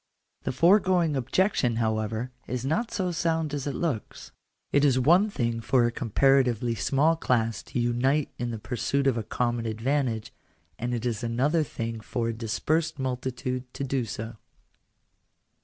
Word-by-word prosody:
The -, -, 0 dB
foregoing 175 Hz, 0 st, +4 dB
objection, 135 Hz, -, +1 dB
however, 110 Hz, +1 st, -1 dB, 0.2 s
is 125 Hz, 0 st, -3 dB
not 220 Hz, -, 0 dB
so 185 Hz, -5 st, -1 dB
sound 160 Hz, -2 st, 0 dB
as 145 Hz, -1 st, -3 dB
it 140 Hz, -, -2 dB
looks. 145 Hz, -11 st, -3 dB, 0.4 s
It 145 Hz, -, +3 dB
is 135 Hz, -3 st, +4 dB
one 175 Hz, +11 st, +5 dB
thing 115 Hz, -, -1 dB
for 125 Hz, +1 st, +3 dB
a 120 Hz, -, +1 dB
comparatively 125 Hz, 0 st, +2 dB
small 140 Hz, +8 st, +2 dB
class 115 Hz, -8 st, 0 dB
to -, -, -4 dB
unite 130 Hz, +5 st, +1 dB
in 120 Hz, 0 st, -2 dB
the 115 Hz, -, -4 dB
pursuit 135 Hz, +5 st, -1 dB
of 135 Hz, -3 st, +3 dB
a 115 Hz, -, -1 dB
common 120 Hz, +1 st, -1 dB
advantage, 115 Hz, 0 st, -1 dB, 0.5 s
and 120 Hz, +2 st, -1 dB
it 115 Hz, 0 st, -4 dB
is 120 Hz, 0 st, -2 dB
another 130 Hz, +8 st, +1 dB
thing 115 Hz, -6 st, -4 dB
for 115 Hz, +2 st, -2 dB
a -, -, -1 dB
dispersed 135 Hz, +9 st, -1 dB
multitude 125 Hz, -1 st, -3 dB
to -, -, -3 dB
do 135 Hz, -2 st, -1 dB
so. 110 Hz, +1 st, -6 dB
125 Hz, 155 wpm, -27 LUFS, 115-145 Hz, 0.5 s, one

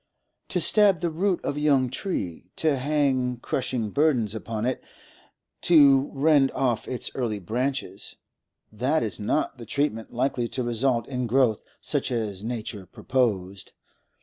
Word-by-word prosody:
To 180 Hz, -, -1 dB
stab 200 Hz, +1 st, +5 dB
the 170 Hz, -2 st, 0 dB
root 180 Hz, +3 st, -1 dB
of 145 Hz, -, -2 dB
a -, -, -1 dB
young 140 Hz, -4 st, +3 dB
tree, 90 Hz, -, -4 dB
to 150 Hz, -4 st, +1 dB
hang 130 Hz, -3 st, +1 dB
crushing 125 Hz, -4 st, -2 dB
burdens 130 Hz, -8 st, +2 dB
upon 110 Hz, 0 st, -4 dB
it, 130 Hz, -, -2 dB, 0.8 s
to 140 Hz, -5 st, +5 dB
rend 145 Hz, -1 st, +3 dB
off 125 Hz, -4 st, 0 dB
its 125 Hz, -, -2 dB
early 115 Hz, -5 st, -2 dB
branches—that 120 Hz, -, -4 dB
is 110 Hz, -1 st, -2 dB
not 125 Hz, +5 st, -1 dB
the 115 Hz, -, -8 dB
treatment 115 Hz, -6 st, -2 dB
likely 125 Hz, -1 st, -1 dB
to 125 Hz, +2 st, -3 dB
result 120 Hz, 0 st, 0 dB
in 125 Hz, -2 st, -3 dB
growth 120 Hz, -3 st, +2 dB, 0.2 s
such -, -, -1 dB
as 105 Hz, -5 st, -2 dB
nature 110 Hz, -4 st, -5 dB
purposed. 100 Hz, -5 st, -2 dB
125 Hz, 140 wpm, -25 LUFS, 110-140 Hz, 0.8 s, stab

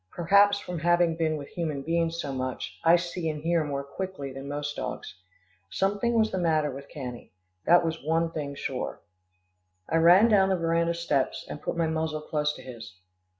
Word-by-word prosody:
Perhaps 200 Hz, -, +4 dB
from 180 Hz, -4 st, -5 dB
having 175 Hz, 0 st, +3 dB
been 160 Hz, -1 st, 0 dB
with 140 Hz, -1 st, -8 dB
human 155 Hz, -5 st, -3 dB
beings 165 Hz, +1 st, 0 dB
so 140 Hz, -4 st, -3 dB
much, 130 Hz, -1 st, -4 dB
I 165 Hz, +1 st, +7 dB
see 175 Hz, -1 st, -2 dB
and 150 Hz, -1 st, -5 dB
hear 170 Hz, -1 st, +2 dB
more 140 Hz, -2 st, -3 dB
quickly 140 Hz, -2 st, -6 dB
than 135 Hz, +1 st, -8 dB
most 145 Hz, +1 st, -4 dB
dogs. -, -, -5 dB, 0.6 s
Something 205 Hz, +5 st, 0 dB
was 220 Hz, -1 st, +3 dB
the 190 Hz, -, -1 dB
matter 155 Hz, -4 st, +1 dB
with 140 Hz, +1 st, -9 dB
Cannie, 125 Hz, -4 st, -8 dB, 0.4 s
that 175 Hz, 0 st, +6 dB
was 160 Hz, -2 st, -3 dB
one 165 Hz, +2 st, +1 dB
thing 145 Hz, -3 st, -4 dB
sure. 130 Hz, -2 st, -4 dB, 0.9 s
I 165 Hz, -, +1 dB
ran 175 Hz, +7 st, +7 dB
down 195 Hz, -4 st, +4 dB
the 190 Hz, -, +3 dB
veranda 170 Hz, 0 st, +1 dB
steps, 150 Hz, -6 st, -1 dB
and 150 Hz, -, -7 dB
put -, -, -3 dB
my 165 Hz, -, +2 dB
muzzle 160 Hz, -1 st, -2 dB
close 150 Hz, -1 st, -1 dB
to -, -, -11 dB
his. 115 Hz, -7 st, -10 dB
165 Hz, 190 wpm, -27 LUFS, 145-175 Hz, 0.9 s, I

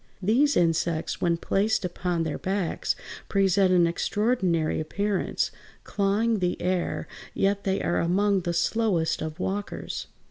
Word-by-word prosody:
These 245 Hz, +10 st, +3 dB
insects, 165 Hz, -1 st, 0 dB
when 170 Hz, -1 st, +2 dB
placed 205 Hz, +4 st, 0 dB
upon 175 Hz, -1 st, -1 dB
their 160 Hz, -2 st, -3 dB
backs, 190 Hz, -2 st, -1 dB, 0.3 s
present 195 Hz, -1 st, +3 dB
an 175 Hz, -2 st, +5 dB
extraordinary 180 Hz, -2 st, 0 dB
appearance, 200 Hz, +5 st, -1 dB, 0.3 s
clawing 210 Hz, +2 st, +1 dB
the 180 Hz, -1 st, -1 dB
air; 180 Hz, -1 st, -1 dB, 0.3 s
yet 200 Hz, +1 st, +1 dB
they 195 Hz, 0 st, 0 dB
are 175 Hz, -, +1 dB
among 195 Hz, +3 st, +2 dB
the 175 Hz, -1 st, -2 dB
slowest 170 Hz, -1 st, +1 dB
of 155 Hz, +2 st, -5 dB
walkers. 200 Hz, +2 st, -4 dB
190 Hz, 130 wpm, -26 LUFS, 170-205 Hz, 0.3 s, an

